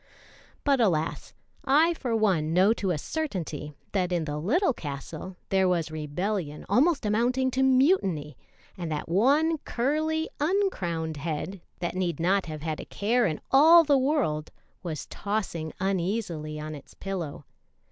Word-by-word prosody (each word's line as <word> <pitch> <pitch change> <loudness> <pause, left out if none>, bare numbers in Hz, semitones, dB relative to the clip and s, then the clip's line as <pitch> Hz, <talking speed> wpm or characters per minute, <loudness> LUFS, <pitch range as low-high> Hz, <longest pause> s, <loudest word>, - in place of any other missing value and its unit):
But 275 -3 +3
alas! 165 -7 0 0.3
I 310 +5 +4
for 250 -8 -2
one 180 -8 +2
know 190 +5 +5
to 200 -4 -2
a 175 - +1
Certainty 160 - -4 0.2
that 185 -3 0
in 170 -3 0
the 150 0 -3
little 275 - +2
castle 150 - -7
there 190 -1 +3
was 165 -3 0
rebellion 155 +2 -3
almost 290 -1 +3
amounting 245 +5 +1
to 260 - 0
mutiny, 255 - +2 0.4
and 170 -3 -5
that 150 - -3
one 285 - +3
curly, 310 +7 -1
uncrowned 185 - 0
head, 165 +5 -4 0.2
that 175 - -2
need 175 -4 -2
not 185 +2 +2
have 155 -1 -6
had 155 -1 -3
a - - -6
care 230 +3 +1
in 155 -3 -3
all 320 +5 +8
the 290 -2 +3
world, 255 - +1 0.3
was 160 -5 -5
tossing 195 -6 -3
uneasily 180 -5 -2
on 155 +1 -5
its 145 -2 -12
pillow. 170 -7 -5
190 Hz, 145 wpm, -27 LUFS, 160-260 Hz, 0.4 s, all